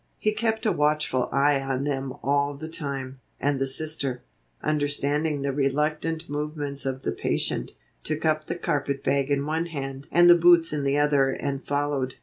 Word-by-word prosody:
He 215 - +1
kept 220 +1 -1
a 215 - +3
watchful 150 -4 +1
eye 140 +1 +3
on 135 0 -2
them 135 -2 -2
all 140 +1 +1
the 155 +3 -7
time, 135 -4 -5 0.2
and 145 -1 0
the 135 - +1
Sister, 135 -2 +1 0.4
understanding 145 0 0
the 140 -1 -1
reluctant 150 +4 -1
movements 145 -1 -4
of 135 0 -4
the - - -1
patient, - - -2 0.3
took 155 +1 -3
up 155 -1 +1
the - - -2
carpet 145 -5 -2
bag 140 0 +1
in 140 0 +1
one 160 +3 -1
hand 135 -3 -6
and 175 0 +6
the 175 - +10
boots 170 -1 +5
in 145 -2 -1
the 140 +1 +2
other 145 -2 +3
and 140 +1 -3
followed. 145 -2 -1
145 Hz, 175 wpm, -25 LUFS, 135-155 Hz, 0.4 s, the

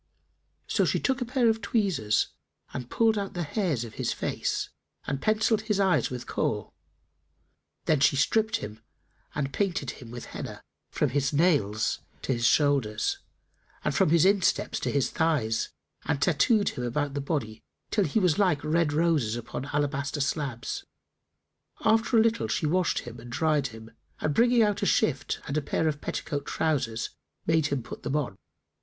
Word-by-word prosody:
So - - +1
she - - +1
took 265 -1 0
a - - 0
pair 245 0 +2
of 225 0 +2
tweezers 175 - +1 0.4
and 125 -1 -5
pulled 225 -2 +3
out 195 -2 -5
the 175 - -1
hairs 160 - -1
of 115 - -8
his - - 0
face - - -2 0.4
and 140 -1 -2
pencilled 215 0 +2
his 205 -2 +2
eyes 180 - +3
with 125 -1 -5
Kohl.[FN#293] - - -2 1.1
Then 155 -3 +3
she 140 - +4
stripped 220 +10 +2
him 110 - -5 0.6
and 140 -2 -2
painted 180 -9 -1
him 120 - -10
with 120 0 -7
Henna[FN#294] - - -7 0.3
from 150 - +1
his 140 +1 0
nails 140 - +2 0.2
to 135 - 0
his 115 -1 +2
shoulders 140 -8 +2 0.6
and - - 0
from - - +3
his 170 +1 +5
insteps 195 -1 +2
to - - -2
his 140 -2 +1
thighs 145 -10 +1 0.4
and 145 - 0
tattooed[FN#295] 200 +7 +3
him 125 - -4
about 145 +4 -1
the 140 - -2
body, 125 -7 -3 0.3
till 205 -3 +2
he 155 - -1
was 180 -6 +3
like 180 -8 +2
red 160 0 +2
roses 150 -8 +2
upon 120 +2 -5
alabaster 145 0 -1
slabs. 135 -4 -2 1.0
After 225 +2 +4
a - - +7
little, 230 0 +1
she - - -1
washed 175 +3 +1
him 120 -1 -9
and 120 +1 -10
dried 150 0 +1
him 110 -1 -11 0.3
and 150 - 0
bringing 240 +2 +5
out 210 -2 +1
a - - +1
shift 135 -2 +1
and 140 - -3
a - - +2
pair 160 +3 0
of 150 -1 -1
petticoat 145 -2 -3
trousers 130 -8 -1 0.3
made 160 -2 +3
him 140 -4 -2
put - - -8
them 140 - -2
on. 140 -10 -1
150 Hz, 175 wpm, -27 LUFS, 130-190 Hz, 1.1 s, a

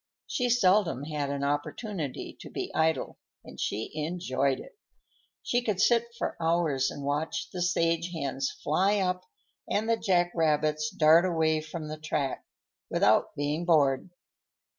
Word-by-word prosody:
She 250 -1 -1
seldom 190 - +3
had 145 -2 -3
an 140 0 -2
opportunity 145 - -3
to - - -10
be - - -5
idle, 160 0 0 0.2
and - - -12
she 110 +2 -2
enjoyed 150 -4 -1
it. - - -12 0.7
She 245 - +1
could 215 -6 -1
sit 235 +2 +4
for - - -2
hours 160 -5 +1
and 145 - -7
watch 145 +3 -2
the 180 - -4
sage 170 -1 +1
hens 140 -4 -2
fly 190 +7 +1
up 180 -2 -1 0.4
and 215 +2 0
the 230 0 +2
jack 175 -5 +2
rabbits 155 -1 +1
dart 160 +3 +5
away 160 -3 +1
from 155 0 -7
the 155 0 -6
track, 150 -3 -2 0.5
without - - +3
being 145 +3 -1
bored. 150 -3 +3
160 Hz, 145 wpm, -28 LUFS, 145-180 Hz, 0.7 s, dart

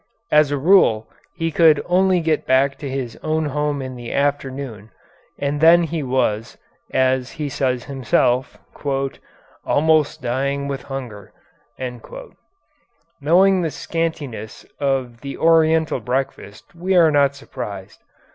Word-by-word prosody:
As 150 -1 +5
a 145 - -1
rule 135 - +4 0.3
he 165 -1 -2
could 155 -2 +5
only 185 0 +3
get 160 -1 -1
back 135 +1 +3
to 140 - -5
his 130 -4 -4
own 155 0 -1
home 145 -1 -2
in 130 -1 -7
the 120 -1 -7
afternoon, 135 -6 -2 0.5
and 145 +1 -2
then 170 +2 +7
he 165 -1 -3
was, 125 -5 -1 0.3
as 130 -1 +1
he 155 -3 -4
says 130 -3 -1
himself, 130 -1 0 1.1
"almost 155 -1 +2
dying 140 +3 -1
with 135 -2 -4
hunger." 125 -8 -8 1.9
Knowing 185 +5 +4
the 165 - -1
scantiness 150 -10 -4
of 130 -4 -1
the 140 -1 -6
Oriental 160 -2 +3
breakfast, 125 -3 -4
we 180 +3 -1
are 165 -3 +6
not 140 -1 +3
surprised. 100 -8 -8
140 Hz, 125 wpm, -20 LUFS, 130-160 Hz, 1.9 s, then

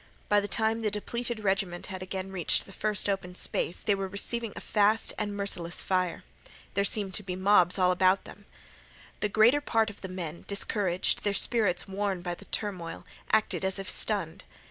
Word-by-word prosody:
By 205 - +5
the 205 - -2
time 220 +1 +1
the 215 - +1
depleted 235 +2 -3
regiment 190 -3 0
had 185 -1 -7
again 190 0 -5
reached 180 -4 +1
the 195 - -12
first 210 -1 0
open 195 -3 -2
space 175 - -2
they 205 - +3
were 195 -1 -2
receiving 220 +4 -1
a - - -5
fast 215 +1 +2
and 205 -1 -3
merciless 175 -4 -2
fire. 185 -2 0 0.5
There 200 - +2
seemed 200 -1 0
to 210 - -1
be 185 -2 -4
mobs 185 -1 +4
all 180 -1 +4
about 185 +1 +3
them. 205 - -12 0.7
The 210 - 0
greater 230 +8 +5
part 225 -6 +1
of 205 - -17
the 190 - -5
men, 175 -3 -6
discouraged, 200 -2 0
their 205 - +1
spirits 205 -7 +3
worn 195 -2 -2
by 175 -1 -2
the - - -11
turmoil, 185 -6 -4 0.2
acted 220 -2 +2
as 190 +1 0
if 195 -1 -5
stunned. 190 -5 -1
195 Hz, 190 wpm, -29 LUFS, 185-210 Hz, 0.7 s, By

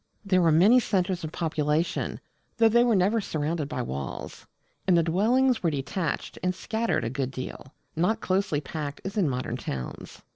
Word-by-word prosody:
There 185 -2 +3
were 165 -2 +4
many 200 +11 +6
centres 185 -5 0
of 155 - -4
population, 155 -1 -1 0.4
though 225 -1 +5
they 235 +2 +5
were 240 -3 +3
never 200 +4 +3
surrounded 155 -3 -2
by 130 -4 -2
walls; 70 - -6 0.4
and 180 -2 +5
the 170 - +4
dwellings 230 +9 +2
were 170 - +2
detached 150 +3 -3
and 180 0 0
scattered 225 +5 -1
a 115 - -1
good 135 -1 -2
deal 130 +2 -8 0.2
not 180 +8 +1
closely 185 -7 0
packed 145 -2 -5
as 195 +2 -4
in 190 -8 +2
modern 125 -2 -3
towns. 65 - -6
170 Hz, 175 wpm, -27 LUFS, 145-200 Hz, 0.4 s, many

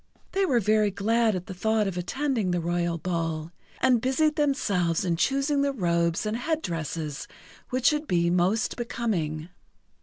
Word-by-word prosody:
They 390 0 +1
were 245 -6 +3
very 215 0 +3
glad 220 +2 +1
at 180 -1 -4
the - - -7
thought 220 +3 +1
of 195 - -3
attending 230 +3 -1
the 175 0 +1
royal 170 0 -1
ball, 165 -2 -3 0.3
and 250 -3 +4
busied 300 +5 +2
themselves 200 - +1
in 170 -2 +1
choosing 275 - +1
the 280 0 +2
robes 170 -4 0
and 215 +1 -1
head 315 +5 -1
dresses 160 -3 -4 0.4
which 255 -1 -2
should 300 0 -2
be 170 -1 +2
most 185 +5 +1
becoming. 180 -10 -2
200 Hz, 160 wpm, -26 LUFS, 170-255 Hz, 0.4 s, and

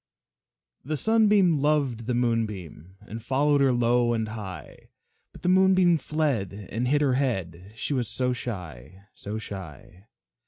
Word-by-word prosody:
The 150 +3 -3
Sunbeam 210 -6 +3
loved 135 -6 0
the 125 - 0
Moonbeam, 105 -8 -2
And 110 +2 -9
followed 140 +3 +2
her 135 -1 +4
low 120 0 +2
and 110 -2 -2
high, 105 -4 -9 0.4
But - - -16
the 180 - +1
Moonbeam 185 -2 +4
fled 140 - -1 0.2
and 120 +3 -1
hid 145 +3 +2
her 140 -3 +2
head, 95 -8 -2
She 130 - -3
was 125 -4 -1
so 125 +2 -1
shy 90 - -8
so 105 +2 -6
shy. 95 - -10
120 Hz, 145 wpm, -26 LUFS, 100-145 Hz, 0.4 s, her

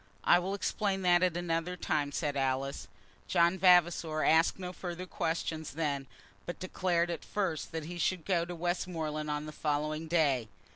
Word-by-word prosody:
"I - - +6
will 190 +3 -2
explain 195 -1 -1
that 175 -1 +5
at 180 -2 +2
another 175 +1 -2
time," 150 -4 -1
said 145 -1 -2
Alice. 135 0 -1 0.4
John 175 +1 +3
Vavasor 170 -3 +4
asked 160 +1 +4
no 180 -1 -6
further 180 0 -6
questions 160 -4 -3
then, 140 -3 -2 0.4
but 175 - -4
declared 175 -2 0
at 165 - -5
first 190 -7 -2
that 160 -2 -4
he 175 +2 -6
should 175 0 0
go 175 -3 +2
to 175 +1 -6
Westmoreland 165 -3 -2
on 150 0 -2
the 155 - -6
following 155 +1 -2
day. 145 -8 +2
170 Hz, 165 wpm, -31 LUFS, 155-180 Hz, 0.4 s, I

